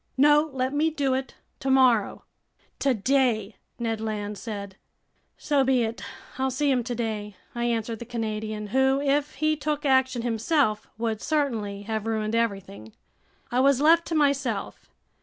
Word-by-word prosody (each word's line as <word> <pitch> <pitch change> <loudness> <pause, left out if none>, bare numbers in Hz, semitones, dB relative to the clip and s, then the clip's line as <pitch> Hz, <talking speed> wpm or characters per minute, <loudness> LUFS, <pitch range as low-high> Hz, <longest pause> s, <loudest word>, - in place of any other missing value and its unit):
"No, 295 +3 +5
let 260 0 -2
me 305 +2 +2
do 285 -4 0
it. 265 0 -3 0.2
Tomorrow—" 260 -5 +3 0.6
"Today," 245 -4 +1 0.2
Ned 225 -2 -2
Land 210 -1 -3
said. 200 -4 -6 0.6
"So 285 -2 +1
be 260 -2 +2
it. 225 +2 -4 0.4
I'll 265 0 +1
see 275 +2 +1
him 250 -2 +1
today," 220 -4 -4 0.2
I 240 0 -2
answered 230 -1 -1
the 235 - -7
Canadian, 215 -2 -4
who, 265 +3 +3
if 285 +1 0
he 310 +3 +1
took 300 0 -3
action 260 -3 +2
himself, 230 -1 +1
would 225 -1 -2
certainly 225 -10 -1
have 220 0 -3
ruined 215 -1 -1
everything. 195 - -2 0.6
I 245 - +1
was 270 0 +4
left 330 +3 +4
to 330 - -2
myself. 280 -8 0
245 Hz, 145 wpm, -26 LUFS, 220-275 Hz, 0.6 s, No